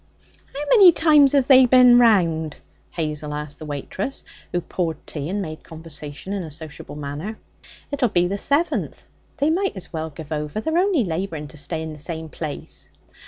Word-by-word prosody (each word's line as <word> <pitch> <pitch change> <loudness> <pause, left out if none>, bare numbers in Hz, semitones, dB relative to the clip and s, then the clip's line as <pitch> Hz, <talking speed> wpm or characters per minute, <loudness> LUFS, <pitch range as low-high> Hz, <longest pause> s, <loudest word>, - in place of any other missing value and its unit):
'How 280 +2 -5
many 400 -7 +9
times 300 -4 +5
have 275 -3 +3
they 260 -2 +7
bin 250 -1 +7
round?' 170 -10 +3 0.3
Hazel 150 -2 -4
asked 150 -1 -6
the 155 - -8
waitress, 150 - -4 0.3
who 175 - 0
poured 170 -2 -3
tea 150 0 -5
and 200 +2 -2
made 155 -2 -8
conversation 160 +1 -7
in 200 - -2
a 165 - -7
sociable 155 -1 -9
manner. 150 +9 -5 0.5
'It'll 265 -4 +1
be 175 -2 +2
the 200 +3 -2
seventh. 290 - 0 0.3
They 290 +3 +2
might 375 - 0
as 180 -1 -5
well 160 0 -3
give 155 0 -11
over. 150 +5 -3
They're 320 +9 0
only 365 - +2
labouring 160 -3 -4
to 155 - -12
stay 160 +3 -3
in 160 -1 -6
the 150 - -11
same 160 +1 -6
place.' 75 - -7
170 Hz, 180 wpm, -22 LUFS, 150-250 Hz, 0.5 s, many